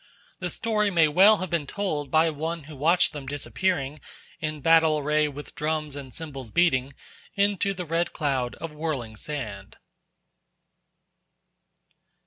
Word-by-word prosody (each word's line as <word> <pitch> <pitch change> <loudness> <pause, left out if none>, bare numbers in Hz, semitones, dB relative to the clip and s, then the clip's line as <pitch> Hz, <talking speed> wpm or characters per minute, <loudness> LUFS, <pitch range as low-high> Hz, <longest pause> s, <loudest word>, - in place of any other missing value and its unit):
The - - -2
story 210 -2 0
may 170 -4 +4
well 195 +8 +6
have 185 -1 -5
been 160 -4 0
told 155 -9 -2
by 160 +3 +4
one 160 +2 -4
who 150 +1 -11
watched 165 +7 +3
them 145 -3 -7
disappearing, 145 +1 -2 0.4
in 155 -1 -3
battle 160 0 +5
array, 150 +1 +2
with 145 0 -8
drums 150 -1 -2
and 135 -2 -8
cymbals 135 -6 -8
beating, 135 -2 +2 0.4
into 200 -1 +2
the 180 -1 -5
red 165 +2 0
cloud 135 -6 -1
of 165 - -7
whirling 145 -8 -3
sand. 110 -7 -5
155 Hz, 135 wpm, -26 LUFS, 140-170 Hz, 0.4 s, well